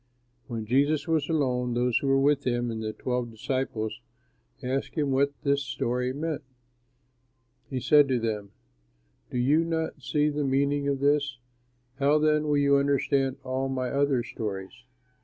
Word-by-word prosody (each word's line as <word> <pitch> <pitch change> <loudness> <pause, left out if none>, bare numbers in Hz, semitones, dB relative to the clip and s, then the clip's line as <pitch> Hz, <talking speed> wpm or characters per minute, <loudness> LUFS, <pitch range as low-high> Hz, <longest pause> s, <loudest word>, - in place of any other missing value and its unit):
When 115 -3 -4
Jesus 140 +5 +2
was 160 -2 +1
alone, 125 -6 0
those 120 -1 +2
who 140 - -3
were 135 0 +4
with 140 0 +3
him 120 -2 0
and 110 -1 -4
the 110 -1 -2
twelve 125 +1 -2
disciples 115 -1 -3 0.6
asked 130 +2 -2
him 145 -4 0
what 140 +2 +2
this 140 -1 +2
story 125 -1 -1
meant. 155 +2 -3 1.3
He 130 - -2
said 145 +3 +5
to 130 -2 +1
them, 105 -3 -3 0.8
"Do - - -4
you 145 +7 +3
not 160 -2 -2
see 150 +2 +1
the 150 0 -1
meaning 140 +1 +1
of 140 -1 -1
this? 145 -2 +2 0.6
How 140 +2 +4
then 150 0 +2
will 145 -1 +2
you 140 0 +4
understand 140 -1 +1
all 130 +1 -2
my 130 -1 -2
other 140 -3 +2
stories? 100 -5 -5
135 Hz, 160 wpm, -27 LUFS, 125-145 Hz, 1.3 s, said